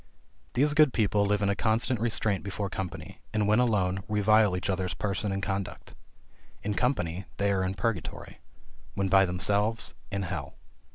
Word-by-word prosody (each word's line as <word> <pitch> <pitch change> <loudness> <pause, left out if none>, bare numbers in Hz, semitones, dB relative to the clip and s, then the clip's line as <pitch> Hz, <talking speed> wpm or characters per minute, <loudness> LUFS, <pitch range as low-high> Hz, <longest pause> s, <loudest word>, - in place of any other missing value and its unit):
These 145 +4 +3
good 150 -3 +5
people 105 -2 +2
live 105 0 +1
in 100 - +2
a 100 - +1
constant 115 +3 +1
restraint 110 -3 +1
before 100 0 -4
company, 95 -3 -6 0.2
and 105 -1 +2
when 105 +3 +4
alone, 95 -6 +1
revile 105 -2 +3
each 90 - -3
other's 95 -1 -1
person 100 0 -2
and 95 0 -3
conduct. 95 -1 -4 0.7
In 105 - -1
company 95 -8 -1
they 100 0 +1
are 95 -1 +1
in 95 +1 -2
purgatory; 95 -10 -3 0.6
when 100 -1 0
by 95 0 +6
themselves, 100 +5 0 0.2
in 100 0 -2
hell. 85 -6 -5
100 Hz, 165 wpm, -28 LUFS, 95-110 Hz, 0.7 s, by